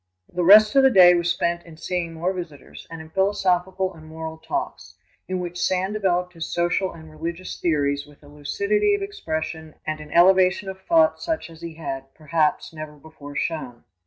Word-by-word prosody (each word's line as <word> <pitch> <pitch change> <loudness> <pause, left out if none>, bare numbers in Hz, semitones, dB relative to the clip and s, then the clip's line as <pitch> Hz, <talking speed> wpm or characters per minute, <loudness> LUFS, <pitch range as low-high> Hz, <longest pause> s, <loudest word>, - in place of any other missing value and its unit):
The 180 - 0
rest 210 +5 +8
of 275 - +7
the 265 - +6
day 180 -6 +8
was 175 0 +1
spent 170 0 -1
in 165 -2 -14
seeing 170 +1 -3
more 175 +4 -1
visitors 170 -7 -9
and 165 -1 -8
in 160 0 -13
philosophical 190 -1 0
and 155 -2 -14
moral 160 0 -7
talks, 345 - -5 0.3
in 185 0 -2
which 175 0 -5
Sand 190 +2 0
developed 180 -3 0
his 165 -2 -6
social 175 +2 0
and 160 -1 -12
religious 170 +4 -6
theories 145 -4 0
with 145 0 -19
a - - -15
lucidity 415 - 0
of 405 - -4
expression 160 - -5
and 155 0 -3
an 150 0 -10
elevation 185 +3 +4
of 190 0 -8
thought 320 - +3
such 320 - -3
as 165 0 -14
he 170 -1 -7
had, 135 -4 -6
perhaps, 155 +1 0
never 155 -1 -8
before 145 -1 -12
shown. 135 -9 -3
170 Hz, 190 wpm, -23 LUFS, 155-190 Hz, 0.3 s, rest